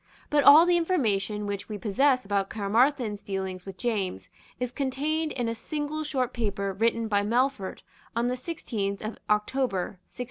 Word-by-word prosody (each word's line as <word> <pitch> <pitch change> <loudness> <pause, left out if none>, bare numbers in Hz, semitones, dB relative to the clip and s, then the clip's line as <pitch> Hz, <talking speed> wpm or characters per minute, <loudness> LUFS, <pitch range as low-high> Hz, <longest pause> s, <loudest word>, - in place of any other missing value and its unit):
But 295 -1 +4
all 305 +4 +9
the 350 0 +4
information 215 - 0
which 205 0 -4
we 210 - -4
possess 255 +5 +2
about 200 -1 0
Caermarthen's 220 +1 +1
dealings 190 -1 -4
with 190 -1 -7
James 195 - -2 0.3
is 250 -1 -2
contained 295 +4 -1
in 245 -3 -2
a 230 - -1
single 300 +5 -3
short 260 -4 -1
paper 200 -4 -2
written 230 +3 +1
by 205 -2 +2
Melfort 235 -1 0 0.3
on 235 +1 +1
the 250 - 0
sixteenth 220 - -4
of 215 +1 -5
October 210 -3 0
1693. - - -17
230 Hz, 165 wpm, -27 LUFS, 200-270 Hz, 0.3 s, all